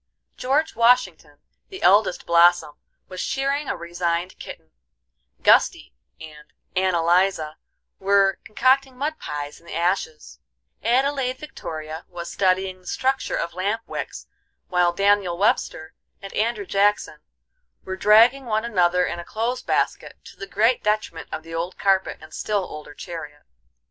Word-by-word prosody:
George 290 Hz, +5 st, 0 dB
Washington, 195 Hz, -11 st, +2 dB, 0.3 s
the 380 Hz, -, -9 dB
eldest 200 Hz, 0 st, +4 dB
blossom, 170 Hz, -2 st, +4 dB, 0.3 s
was 185 Hz, -1 st, -6 dB
shearing 275 Hz, +1 st, -1 dB
a -, -, -2 dB
resigned 170 Hz, +1 st, -3 dB
kitten; -, -, -10 dB, 0.7 s
Gusty -, -, +3 dB, 0.3 s
and 150 Hz, -1 st, -12 dB, 0.2 s
Ann 185 Hz, -1 st, +2 dB
Eliza 170 Hz, -2 st, +1 dB, 0.4 s
were 195 Hz, 0 st, +3 dB
concocting 260 Hz, +3 st, +1 dB
mud 305 Hz, +4 st, -3 dB
pies 145 Hz, 0 st, -6 dB
in 170 Hz, -, -22 dB
the -, -, -7 dB
ashes; 170 Hz, -3 st, -2 dB, 0.4 s
Adelaide 260 Hz, +2 st, +1 dB
Victoria 160 Hz, -, -7 dB
was 170 Hz, -1 st, -7 dB
studying 185 Hz, -1 st, 0 dB
the 180 Hz, -, -19 dB
structure 265 Hz, +6 st, -1 dB
of 170 Hz, -, -3 dB
lamp 200 Hz, +5 st, -2 dB
wicks, -, -, -6 dB, 0.4 s
while 180 Hz, -1 st, +3 dB
Daniel 200 Hz, -1 st, +2 dB
Webster 175 Hz, -5 st, 0 dB, 0.3 s
and 195 Hz, -, -10 dB
Andrew 215 Hz, -1 st, -1 dB
Jackson 205 Hz, +2 st, +1 dB, 0.7 s
were 190 Hz, -, -4 dB
dragging 230 Hz, +7 st, +5 dB
one 220 Hz, -1 st, -1 dB
another 180 Hz, -5 st, +2 dB
in 175 Hz, -, -4 dB
a -, -, -6 dB
clothes 230 Hz, +7 st, -3 dB
basket, -, -, -1 dB
to -, -, -14 dB
the 195 Hz, -, -8 dB
great 225 Hz, +5 st, +2 dB
detriment 210 Hz, -6 st, -2 dB
of 160 Hz, -, -5 dB
the 165 Hz, 0 st, -11 dB
old 170 Hz, +3 st, -4 dB
carpet 195 Hz, -1 st, +1 dB
and 155 Hz, 0 st, -14 dB
still 205 Hz, -2 st, -1 dB
older 150 Hz, -3 st, -9 dB
chariot. 150 Hz, -4 st, -8 dB
190 Hz, 140 wpm, -23 LUFS, 170-225 Hz, 0.7 s, dragging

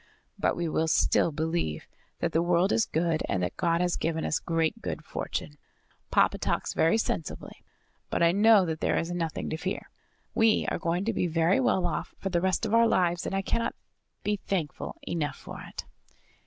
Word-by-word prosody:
"But -, -, +1 dB
we 170 Hz, -1 st, -2 dB
will 160 Hz, 0 st, 0 dB
still 160 Hz, -, +3 dB
believe 160 Hz, -, -2 dB, 0.3 s
that -, -, 0 dB
the 165 Hz, -, +2 dB
world 175 Hz, +2 st, +2 dB
is 225 Hz, -, +2 dB
good 160 Hz, 0 st, 0 dB
and 90 Hz, -2 st, 0 dB
that 90 Hz, -, -2 dB
God 170 Hz, -1 st, +1 dB
has 180 Hz, -1 st, +1 dB
given 160 Hz, -1 st, -1 dB
us -, -, 0 dB
great 165 Hz, +6 st, -1 dB
good 155 Hz, -, -5 dB
fortune. 150 Hz, -1 st, -4 dB, 0.5 s
Papa -, -, +3 dB
talks -, -, -1 dB
very 165 Hz, +7 st, +3 dB
sensibly; 165 Hz, -8 st, -4 dB, 0.5 s
but -, -, +1 dB
I 170 Hz, -, +6 dB
know 205 Hz, +1 st, +6 dB
that 160 Hz, -2 st, -3 dB
there -, -, +1 dB
is 165 Hz, -, -1 dB
nothing 170 Hz, -3 st, -2 dB
to 155 Hz, -, -2 dB
fear. 185 Hz, +4 st, -4 dB, 0.4 s
We 225 Hz, -1 st, +3 dB
are -, -, -1 dB
going 175 Hz, +3 st, -1 dB
to 230 Hz, -, 0 dB
be 180 Hz, -, 0 dB
very 165 Hz, +5 st, +2 dB
well 250 Hz, -8 st, +2 dB
off 175 Hz, -, -3 dB
for 195 Hz, -, -3 dB
the 175 Hz, -2 st, +1 dB
rest 190 Hz, +4 st, +1 dB
of 220 Hz, -, -2 dB
our 230 Hz, 0 st, +6 dB
lives, 175 Hz, -4 st, +1 dB
and -, -, -2 dB
I 195 Hz, -, 0 dB
cannot 230 Hz, +4 st, -1 dB, 0.5 s
be 210 Hz, 0 st, 0 dB
thankful 175 Hz, -7 st, -3 dB
enough 155 Hz, -4 st, -2 dB
for -, -, -9 dB
it." -, -, -8 dB
170 Hz, 195 wpm, -28 LUFS, 160-195 Hz, 0.5 s, I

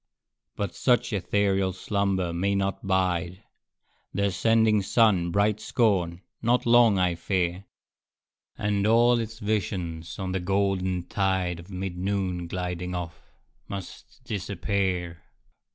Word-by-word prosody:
But 100 Hz, -3 st, -3 dB
such 125 Hz, -2 st, +1 dB
ethereal 95 Hz, 0 st, +1 dB
slumber 95 Hz, -2 st, -1 dB
may 100 Hz, +4 st, 0 dB
not 95 Hz, 0 st, -2 dB
bide 90 Hz, -1 st, 0 dB, 0.7 s
The 100 Hz, +1 st, +1 dB
ascending 110 Hz, +2 st, +3 dB
sun's 95 Hz, -4 st, +3 dB
bright 100 Hz, +3 st, +2 dB
scorn 100 Hz, -8 st, +1 dB, 0.2 s
not 120 Hz, +2 st, +2 dB
long, 120 Hz, -3 st, +6 dB
I 90 Hz, -1 st, +2 dB
fear; 90 Hz, +1 st, -1 dB, 0.9 s
And 105 Hz, -1 st, 0 dB
all 120 Hz, +2 st, +5 dB
its 115 Hz, 0 st, -5 dB
visions 90 Hz, -7 st, -3 dB
on 95 Hz, -1 st, -3 dB
the 95 Hz, -, -1 dB
golden 95 Hz, -1 st, 0 dB
tide 95 Hz, -3 st, 0 dB
Of 85 Hz, +3 st, -12 dB
mid 95 Hz, -1 st, -5 dB
noon 95 Hz, -2 st, -1 dB
gliding 90 Hz, 0 st, -4 dB
off, 85 Hz, -7 st, -7 dB, 0.4 s
must 100 Hz, -3 st, -9 dB
disappear. 95 Hz, -3 st, -2 dB
95 Hz, 120 wpm, -26 LUFS, 90-105 Hz, 0.9 s, long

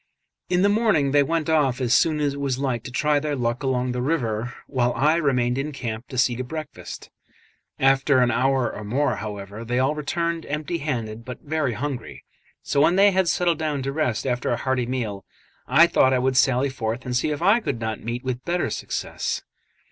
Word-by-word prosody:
In 180 Hz, +1 st, +2 dB
the -, -, +5 dB
morning 205 Hz, -10 st, +2 dB
they 145 Hz, 0 st, +5 dB
went 160 Hz, +2 st, 0 dB
off 145 Hz, -6 st, +2 dB
as 120 Hz, -2 st, +1 dB
soon 155 Hz, +1 st, +3 dB
as 145 Hz, -2 st, 0 dB
it 140 Hz, -, -7 dB
was 135 Hz, -3 st, -1 dB
light 130 Hz, -4 st, -2 dB
to 130 Hz, -, -6 dB
try 150 Hz, +3 st, +2 dB
their 150 Hz, 0 st, -2 dB
luck 120 Hz, -1 st, -1 dB
along 130 Hz, -2 st, 0 dB
the 125 Hz, 0 st, -2 dB
river, 120 Hz, -5 st, -1 dB
while 125 Hz, -3 st, 0 dB
I 150 Hz, +7 st, +3 dB
remained 125 Hz, -5 st, +1 dB
in 150 Hz, +2 st, -3 dB
camp 120 Hz, -4 st, -5 dB
to 130 Hz, -, -7 dB
see 125 Hz, -1 st, +3 dB
to 130 Hz, -, -2 dB
breakfast. 155 Hz, +3 st, -8 dB, 0.7 s
After 135 Hz, +1 st, +3 dB
an 125 Hz, -1 st, +4 dB
hour 130 Hz, -2 st, +1 dB
or 105 Hz, -, -7 dB
more, 125 Hz, +2 st, 0 dB
however, 105 Hz, 0 st, -6 dB
they 120 Hz, +2 st, -2 dB
all 130 Hz, +3 st, +2 dB
returned, 165 Hz, +2 st, -2 dB
empty 150 Hz, +3 st, -2 dB
handed 115 Hz, -6 st, -3 dB
but 125 Hz, +1 st, -9 dB
very 150 Hz, -4 st, -1 dB
hungry; 130 Hz, +1 st, -5 dB, 0.4 s
so 140 Hz, -, +1 dB
when 165 Hz, +4 st, +4 dB
they 200 Hz, +1 st, +6 dB
had 190 Hz, -1 st, +2 dB
settled 170 Hz, -2 st, +1 dB
down 150 Hz, -4 st, -1 dB
to 135 Hz, +1 st, -2 dB
rest 140 Hz, -7 st, -1 dB
after 125 Hz, -2 st, -1 dB
a 120 Hz, -, +1 dB
hearty 130 Hz, -2 st, -1 dB
meal, 110 Hz, -6 st, -3 dB, 0.4 s
I 170 Hz, -, +7 dB
thought 130 Hz, -6 st, +3 dB
I -, -, +3 dB
would 130 Hz, +1 st, +1 dB
sally 130 Hz, +1 st, +3 dB
forth 115 Hz, 0 st, -3 dB
and 125 Hz, -1 st, -2 dB
see 125 Hz, -, +1 dB
if 150 Hz, +2 st, -3 dB
I 205 Hz, +6 st, +5 dB
could 140 Hz, -, -3 dB
not 110 Hz, -2 st, -3 dB
meet 120 Hz, +2 st, -4 dB
with 130 Hz, -1 st, -3 dB
better 175 Hz, +3 st, -1 dB
success. -, -, -3 dB
135 Hz, 210 wpm, -24 LUFS, 125-150 Hz, 0.7 s, I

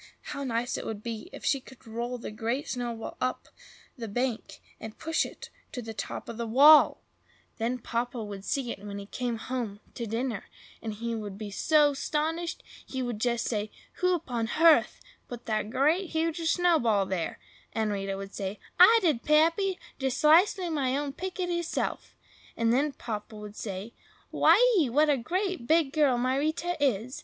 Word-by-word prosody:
How 280 Hz, -1 st, -4 dB
nice 240 Hz, -2 st, -1 dB
it -, -, -7 dB
would 215 Hz, -1 st, -5 dB
be 235 Hz, +8 st, -5 dB
if -, -, -9 dB
she 275 Hz, -, +2 dB
could 260 Hz, 0 st, -16 dB
roll 235 Hz, +2 st, -4 dB
the 230 Hz, -, -7 dB
Great 230 Hz, +6 st, -2 dB
Snowball 240 Hz, -3 st, -4 dB
up 255 Hz, -, -2 dB, 0.5 s
the 235 Hz, -5 st, -6 dB
bank, 245 Hz, +2 st, -3 dB, 0.2 s
and 220 Hz, -1 st, -8 dB
push 325 Hz, 0 st, 0 dB
it -, -, -11 dB, 0.2 s
to 250 Hz, -, -4 dB
the 225 Hz, -2 st, -6 dB
top -, -, -5 dB
of 230 Hz, -, -7 dB
the 235 Hz, -1 st, -3 dB
wall! 285 Hz, +7 st, +7 dB, 0.6 s
Then 235 Hz, +3 st, 0 dB
Papa 240 Hz, 0 st, -3 dB
would 200 Hz, -2 st, -7 dB
see 250 Hz, +2 st, -1 dB
it -, -, -8 dB
when 200 Hz, -1 st, -6 dB
he 200 Hz, -, -7 dB
came 240 Hz, +2 st, -3 dB
home 225 Hz, -4 st, -4 dB
to 235 Hz, -, -5 dB
dinner, 225 Hz, -1 st, -2 dB, 0.4 s
and 220 Hz, -2 st, -4 dB
he 230 Hz, +2 st, -3 dB
would 210 Hz, -3 st, -5 dB
be 210 Hz, -1 st, -6 dB
so 295 Hz, +6 st, +4 dB
'stonished! 320 Hz, +4 st, -2 dB, 0.2 s
he 260 Hz, -1 st, -4 dB
would 240 Hz, -4 st, -4 dB
say, 230 Hz, -3 st, 0 dB, 0.3 s
"Who—upon—yerth—put 320 Hz, -, +1 dB
that 215 Hz, -1 st, -1 dB
great, 315 Hz, -, +2 dB
hugeous 325 Hz, 0 st, 0 dB
snowball 310 Hz, -, +3 dB
there?" 185 Hz, -3 st, -3 dB, 0.3 s
And 220 Hz, -1 st, -1 dB
Rita 195 Hz, -1 st, -2 dB
would 195 Hz, 0 st, -7 dB
say, 195 Hz, +1 st, -4 dB, 0.2 s
"I 445 Hz, +6 st, +9 dB
did, 300 Hz, -9 st, +2 dB
Pappy! 330 Hz, +5 st, +3 dB, 0.2 s
just 265 Hz, -2 st, -1 dB
'cisely 355 Hz, +5 st, +5 dB
all 340 Hz, -, -3 dB
my 270 Hz, -4 st, 0 dB
own 285 Hz, -1 st, -3 dB
pitickiler 355 Hz, 0 st, -2 dB
self." 335 Hz, -, -3 dB, 0.4 s
And 230 Hz, 0 st, +2 dB
then 285 Hz, +3 st, +1 dB
Papa 215 Hz, -3 st, -6 dB
would 210 Hz, 0 st, -9 dB
say, 200 Hz, +2 st, -6 dB, 0.4 s
"Why -, -, +6 dB, 0.2 s
ee! 290 Hz, -7 st, +2 dB
what 295 Hz, +5 st, +4 dB
a 280 Hz, -, +2 dB
great, 365 Hz, -, -2 dB
big 315 Hz, -3 st, +3 dB
girl 290 Hz, -5 st, +3 dB
my 255 Hz, +2 st, +1 dB
Rita 315 Hz, +4 st, -1 dB
is! 250 Hz, -1 st, 0 dB
250 Hz, 175 wpm, -28 LUFS, 225-310 Hz, 0.6 s, I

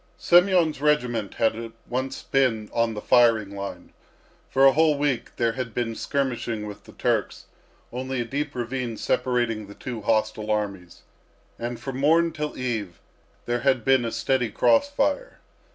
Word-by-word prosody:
Semyon's 175 Hz, -4 st, +4 dB
regiment 125 Hz, -8 st, +1 dB
had 115 Hz, 0 st, -1 dB
once 130 Hz, +2 st, -3 dB
been 115 Hz, -6 st, +1 dB
on 115 Hz, -1 st, +1 dB
the 105 Hz, -, -5 dB
firing 115 Hz, -5 st, +4 dB
line. 100 Hz, 0 st, -7 dB, 0.6 s
For 135 Hz, +1 st, +4 dB
a 135 Hz, -, +8 dB
whole 155 Hz, +1 st, +3 dB
week 145 Hz, -4 st, -1 dB
there 115 Hz, -1 st, +1 dB
had 115 Hz, -2 st, -5 dB
been 120 Hz, -2 st, -1 dB
skirmishing 120 Hz, -5 st, -2 dB
with 105 Hz, -1 st, -9 dB
the -, -, -14 dB
Turks, -, -, -1 dB, 0.5 s
only 130 Hz, +1 st, -3 dB
a -, -, -3 dB
deep 145 Hz, +3 st, -3 dB
ravine 120 Hz, -1 st, -3 dB
separating 120 Hz, -4 st, 0 dB
the 100 Hz, -, -12 dB
two 120 Hz, -4 st, -6 dB
hostile 110 Hz, 0 st, 0 dB
armies; 100 Hz, -5 st, -3 dB, 0.6 s
and 120 Hz, 0 st, -4 dB
from 135 Hz, -2 st, -5 dB
morn 165 Hz, +4 st, +4 dB
till 150 Hz, -1 st, -4 dB
eve 110 Hz, -9 st, -3 dB, 0.5 s
there 120 Hz, 0 st, 0 dB
had 130 Hz, -2 st, +1 dB
been 135 Hz, -2 st, +4 dB
a 115 Hz, -, -2 dB
steady 120 Hz, +1 st, 0 dB
cross 285 Hz, -, +3 dB
fire. 285 Hz, -, -1 dB
120 Hz, 155 wpm, -25 LUFS, 110-135 Hz, 0.6 s, a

